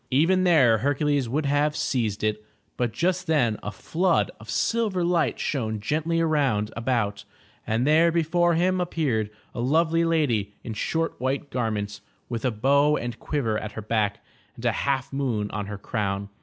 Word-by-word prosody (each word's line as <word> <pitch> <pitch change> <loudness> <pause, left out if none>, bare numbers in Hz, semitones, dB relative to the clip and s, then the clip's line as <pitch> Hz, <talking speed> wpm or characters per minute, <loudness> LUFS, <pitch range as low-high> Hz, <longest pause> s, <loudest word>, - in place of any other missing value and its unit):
Even 175 +8 +3
there 130 -11 +5
Hercules 145 0 +1
would 145 +5 -1
have 145 +1 +1
seized 110 -6 -1
it, 105 0 -1 0.3
but 120 -2 -1
just 180 +8 -1
then 125 -9 +2
a 105 - -4
flood 175 +7 0
of - - -13
silver 215 -6 0
light 170 -2 +1
shone 110 -6 -2
gently 155 +9 -1
roimd 140 -10 +1
about, 115 -4 -1 0.4
and 115 +3 +1
there 160 +3 +5
before 170 +1 +2
him 180 +2 +2
appeared 140 -12 -1 0.2
a - - -6
lovely 165 +5 +2
lady 125 -12 +1
in 115 - -5
short 165 +9 -1
white 135 +2 -2
garments, 105 -4 -2 0.3
with 115 -2 -3
a 130 - +2
bow 140 +6 +3
and 120 -1 -5
quiver 115 -8 -1
at 105 -1 -7
her 110 - -5
back 105 -2 -1 0.3
and 120 - -9
a 120 - +4
half 135 +2 -1
moon 120 -7 -1
on 105 -1 -4
her 105 0 -5
crown. 100 -2 -3
130 Hz, 170 wpm, -25 LUFS, 110-160 Hz, 0.4 s, there